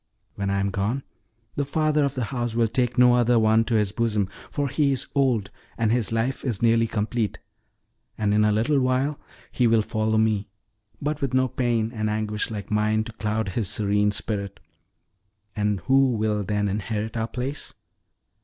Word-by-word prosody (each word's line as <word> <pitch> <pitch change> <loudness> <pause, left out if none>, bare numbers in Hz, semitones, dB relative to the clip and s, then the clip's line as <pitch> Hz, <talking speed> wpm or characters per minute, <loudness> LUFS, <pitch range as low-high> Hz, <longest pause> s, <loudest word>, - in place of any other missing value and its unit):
When 100 -1 -3
I 100 0 +1
am 100 0 0
gone, 110 +8 -1 0.5
the 145 - 0
father 150 +1 +1
of 140 -1 -1
the 130 - -1
house 120 -2 -2
will 115 -1 +3
take 125 +1 -1
no 125 0 +6
other 120 0 +3
one 110 0 +4
to 115 - 0
his 105 -3 +2
bosom, 105 -4 0 0.2
for 145 -1 -1
he 140 +1 +1
is 135 - -1
old, 125 -8 +1 0.3
and 115 -2 +1
his 120 -2 +1
life 115 +4 -1
is 120 -7 -1
nearly 115 0 +4
complete; 110 0 -2 0.8
and 105 -1 +1
in 105 0 +4
a 105 - +3
little 115 +7 +2
while 130 +3 0 0.3
he 125 - +2
will 115 -1 +3
follow 110 0 0
me, 110 -2 +1 0.5
but 150 0 -2
with 135 -2 -1
no 130 0 +3
pain 115 -3 0
and 110 -2 -1
anguish 105 0 -2
like 105 -2 -6
mine 105 +1 +2
to 115 - -8
cloud 110 -1 -2
his 100 0 -1
serene 105 0 +1
spirit. 100 -1 -3 1.0
And 105 -2 0
who 135 +4 +3
will 105 -2 0
then 105 +1 0
inherit 105 +2 -3
our 115 -1 -1
place? 125 +5 -5
110 Hz, 180 wpm, -24 LUFS, 105-125 Hz, 1.0 s, no